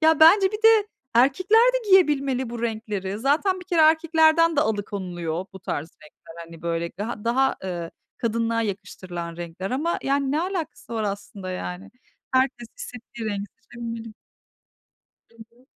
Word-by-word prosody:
Ya, 320 -1 +4
bence 380 +5 +7
bir 425 +1 -5
de 445 -2 +6 0.3
erkekler 320 - +4
de 475 -4 -2
giyebilmeli 275 -9 +3
bu 235 0 -6
renkleri. 210 -3 -3
Zaten 325 - +1
bir - - -11
kere 345 -3 +1
erkeklerden 320 0 +4
de - - +5
alıkonuluyor 185 - -2
bu 190 - -11
tarz 155 -3 -4
renkler, 155 +1 -16
hani, 165 0 -14
böyle 170 0 -1
gaha 210 +5 -6
daha, 265 +3 +2
ııı, 175 -3 -4 0.3
kadınlığa 230 -1 0
yakıştırılan 175 -4 -5
renkler 175 +2 -6
ama, 305 +7 0
yani, 275 0 +1
ne 305 - +1
alakası 335 - -4
var 220 - -1
aslında 200 -2 -5
yani? 185 +2 -6 0.4
Herkes 260 -3 +1
istediği 235 -2 -8
rengi 200 0 -3 0.2
seçebilmeli. 230 -2 -7 1.2
Hı 230 - -25 0.2
hı. 250 - -25
235 Hz, 150 wpm, -24 LUFS, 195-315 Hz, 1.2 s, bence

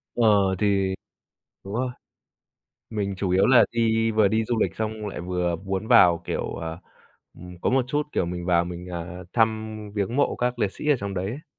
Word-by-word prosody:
Ờ, 100 -5 +4
thì 100 -2 +1 0.7
đúng 100 +2 -7
rồi, 125 +1 -1 1.0
mình 100 -3 -2
chủ 95 -1 -1
yếu 95 +2 +4
là 125 -2 +7
đi 115 -1 +1
vừa 110 -2 +4
đi 110 +3 +1
du 120 0 -1
lịch - - 0
xong 110 -1 -3
lại 95 - -6
vừa 90 -1 -1
muốn 95 +4 -4
vào, 90 -8 +6
kiểu, - - -3
ờ, 80 0 -5 0.6
ừm, 90 0 -11
có - - +1
một 130 -1 +2
chút, 145 +3 0
kiểu, - - 0
mình 85 0 -5
vào 85 -1 +3
mình, 90 +1 -7
à, 90 0 -6
thăm 110 -1 +1 0.2
viếng 105 +4 -1
mộ 145 - +2
các 125 0 -1
liệt 100 -3 +1
sĩ 150 - -4
ở 145 - +5
trong 100 -1 -4
đấy 90 0 -2
ấy. 125 +10 -6
100 Hz, 200 wpm, -25 LUFS, 90-115 Hz, 1.0 s, là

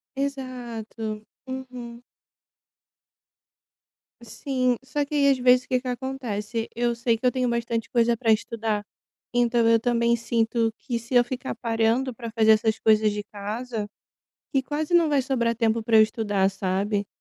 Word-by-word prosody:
Exato. 240 -5 -5 0.2
Uhum. 250 -2 -7 2.2
Sim, 255 +2 -1
só 285 +2 -1
que 285 - -10
aí 280 -1 +5
às 270 - +2
vezes 250 0 +4
o - - -31
que 255 -1 +1
que 260 - -8
acontece? 240 -4 -4
Eu 240 0 0
sei 235 -1 +1
que 245 - -6
eu 250 - +5
tenho 255 -1 0
bastante 235 -1 -2
coisa 235 -1 +2
para 225 -1 +1
estudar, 215 -1 -1 0.5
então 240 -1 +3
eu 230 0 +5
também 235 0 +2
sinto 230 0 0
que 245 -3 -3
se 235 +3 -5
eu 245 - +7
ficar 255 +1 -5
parando 230 +2 0
para 230 -1 -7
fazer 220 -1 +4
essas 220 0 +2
coisas 215 -1 +4
de 210 0 -4
casa, 210 +2 -5 0.7
que 270 -2 +2
quase 295 +5 -2
não 340 -2 +5
vai 285 -2 +3
sobrar 240 -3 0
tempo 230 -1 +1
para 225 0 +3
eu 220 - +9
estudar, 205 -3 +1
sabe? 195 +2 -1
235 Hz, 160 wpm, -25 LUFS, 220-255 Hz, 2.2 s, eu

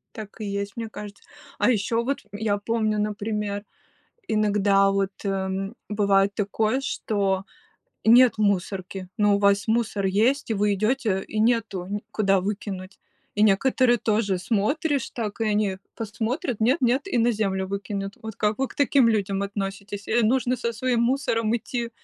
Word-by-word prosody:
Так 215 0 -9
и 215 - -4
есть, 200 0 -4
мне 225 -1 -4
кажется. 205 -2 -9 0.4
А - - +3
ещё 230 0 +1
вот, 275 +3 -1
я 205 0 -1
помню, 215 0 0
например, 210 0 -2 0.6
иногда, 205 -2 +3
вот, 195 0 0
э, 195 -1 -1 0.4
бывает 200 -1 +2
такое, 215 +5 0
что 195 -7 -1 0.6
нет 235 0 +6
мусорки, 190 -2 -1
но 205 -2 +4
у - - +2
вас 200 0 +3
мусор 220 -3 0
есть, 230 +8 +1
и - - +2
вы 205 0 +2
идёте, 215 -2 0
и 215 - -2
нету, 220 -5 +1
н 205 0 -2
куда 195 -3 +2
выкинуть. 195 -1 -5 0.3
И 210 - +1
некоторые 240 +4 +4
тоже, 210 -4 0
смотришь, 250 - 0
так, 220 -2 -5
и - - +2
они 205 -2 0 0.2
посмотрят, 225 +3 -3
нет-нет, 255 - +2
и 305 - 0
на 235 +1 +3
землю 195 -3 -1
выкинут. 200 0 -4
Вот 220 -2 -7
как 210 +1 0
вы 270 - 0
к - - -14
таким 275 -3 +4
людям 200 -3 0
относитесь? 200 0 -5
Э, 235 +1 +2
нужно 250 +2 +2
со 235 -1 -2
своим 240 +1 0
мусором 235 -3 +1
идти, 235 0 -4
210 Hz, 160 wpm, -25 LUFS, 200-230 Hz, 0.6 s, нет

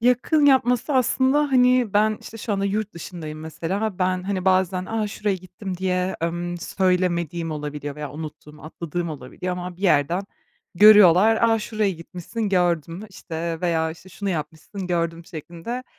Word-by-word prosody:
Yakın 250 +6 +3
yapması 255 0 +3
aslında, 260 +2 +3
hani, 250 -3 +4
ben, 215 +1 +3
işte, 225 - -10
şu 215 - -3
anda 200 0 0
yurt 210 +1 -1
dışındayım 160 -3 -7
mesela, 165 +4 -4
ha, 215 -4 -2
ben, 185 0 0
hani, 190 -1 -2
bazen, 185 -1 +2
a, 220 -1 -1
şuraya 205 -1 -1
gittim 185 +1 -7
diye, 185 0 -1
ımm, 175 +1 -3
söylemediğim 175 -2 0
olabiliyor 150 -1 -5
veya 150 -1 -6
unuttuğum, 150 0 -9
atladığım 170 +2 -4
olabiliyor 150 +5 -5
ama 180 0 -6
bir 185 - -14
yerden 170 0 +2 0.5
görüyorlar. 210 +1 +7
"A, 225 -1 +4
şuraya 215 -1 -1
gitmişsin 180 +5 -5
gördüm" 175 -2 0 0.6
veya, 165 -2 +1
işte, 170 +3 -12
"Şunu 200 +2 -4
yapmışsın 160 +4 -5
gördüm" 170 -1 -1
şeklinde, 175 - -7
185 Hz, 150 wpm, -23 LUFS, 165-210 Hz, 0.6 s, görüyorlar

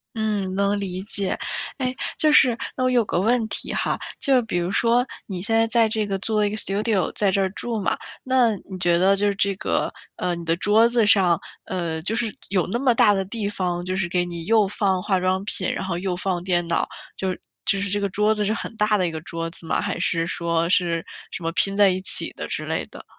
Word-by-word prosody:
嗯， 210 -4 -1
能 200 +1 +1
理 185 -1 -4
解。 200 -1 0 0.4
诶， 255 -1 -1 0.2
就 305 -1 +4
是 250 -5 +6 0.2
那 - - -2
我 255 - +3
有 245 -2 +3
个 175 - -1
问 230 +3 +2
题 - - -2
哈。 - - 0 0.2
就 265 -3 +3
比 220 -6 -4
如 175 +2 -2
说 235 +4 +3 0.2
你 185 -3 -5
现 215 +4 0
在 225 0 +4
在 230 -1 +3
这 215 0 0
个 195 -1 -2
做 215 +1 +1
一 205 - +1
个 215 - -4
Studio， 205 -2 +1
在 205 -2 +2
这 195 +1 +1
儿 190 - +2
住 225 +3 -4
嘛。 195 - 0 0.3
那 255 -3 +3 0.2
你 190 - -6
觉 175 -1 +3
得 190 +2 +4
就 205 +1 +1
这 200 0 +1
个 - - -1 0.2
呃， 175 - -1
你 170 - -7
的 165 0 +1
桌 215 +5 +4
子 235 -3 +2
上， 185 -5 +4 0.2
呃， 170 -3 -3
就 205 +6 -2
是 225 -3 -1
有 185 -3 +1
那 230 - -1
么 265 -2 +4
大 230 -3 +5
的 195 -1 -1
地 205 +1 -3
方， 180 -3 -2
就 185 - -2
是 190 -2 -1
给 180 0 +1
你 170 -1 -6
又 220 -1 +4
放 190 -1 0
化 190 -2 +1
妆 185 +1 0
品， 200 -2 -1
然 - - -3
后 185 -3 -2
又 180 0 -2
放 180 -1 -2
电 175 -2 0
脑。 170 - 0 0.3
就 190 -1 -2 0.3
就 195 - +2
是 200 - 0
这 205 +2 0
个 200 - 0
桌 210 +3 +2
子 210 - -1
是 210 - +1
很 225 0 -5
大 210 -1 +2
的 185 - +1
一 - - -2
个 160 - -5
桌 165 +1 -4
子 170 - -8
吗？ - - 0
还 - - -2
是 165 -1 0
说 170 -1 -1
是 170 -2 +1 0.3
什 - - -6
么 165 - -1
拼 195 +3 0
在 205 -1 +6
一 185 0 0
起 - - 0
的 - - -5
之 - - -3
类 - - -1
的？ - - -11
195 Hz, 275 characters per minute, -23 LUFS, 180-220 Hz, 0.4 s, 是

